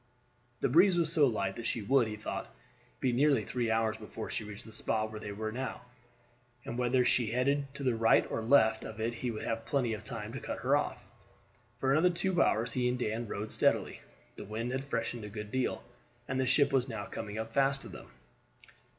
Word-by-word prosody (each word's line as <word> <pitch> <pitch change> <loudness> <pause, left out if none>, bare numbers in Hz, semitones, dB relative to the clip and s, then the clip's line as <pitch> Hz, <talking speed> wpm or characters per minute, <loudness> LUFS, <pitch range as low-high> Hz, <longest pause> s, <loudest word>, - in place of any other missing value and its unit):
The - - +3
breeze 180 +2 +5
was 165 -1 +3
so 150 -4 +6
light 100 -5 -1
that 115 - -4
she 115 - -2
would, 125 +2 +3
he 105 - -4
thought, 105 - -5 0.5
be 130 - +1
nearly 140 +3 +3
three 120 -2 -1
hours 110 0 +1
before 110 0 -7
she - - -3
reached 105 0 -9
the 110 - -11
spot 110 0 -1
where 110 - -6
they 105 - -6
were 110 +2 -4
now, 130 +1 -4 0.8
and 115 - -4
whether 125 +1 +2
she 120 -2 +3
headed 140 +4 0
to 140 - -5
the 130 -2 +2
right 115 0 +4
or - - -1
left 110 -1 +4
of 110 0 -8
it 115 +2 -1
he 125 +1 -3
would 110 -2 -4
have 115 0 -2
plenty 125 -5 +1
of 110 - -6
time - - -5
to - - -4
cut - - -5
her - - +3
off. - - 0 0.8
For 135 +2 +1
another 160 +6 +5
two 180 0 +1
hours 115 +2 +2
he 125 -1 +1
and 125 - -1
Dan 115 -1 -2
rowed 105 +1 -4
steadily. - - +1 0.4
The - - -7
wind 115 +4 -3
had 130 +1 -2
freshened 115 -3 -3
a 105 - -6
good 105 0 -7
deal, 130 -1 -1 0.4
and 130 0 -1
the 130 - +1
ship 140 +1 +3
was 130 -1 +2
now 110 -3 -4
coming 105 0 -6
up 110 0 -5
fast 135 0 +2
to - - -9
them. - - -10
120 Hz, 220 wpm, -31 LUFS, 110-135 Hz, 0.8 s, so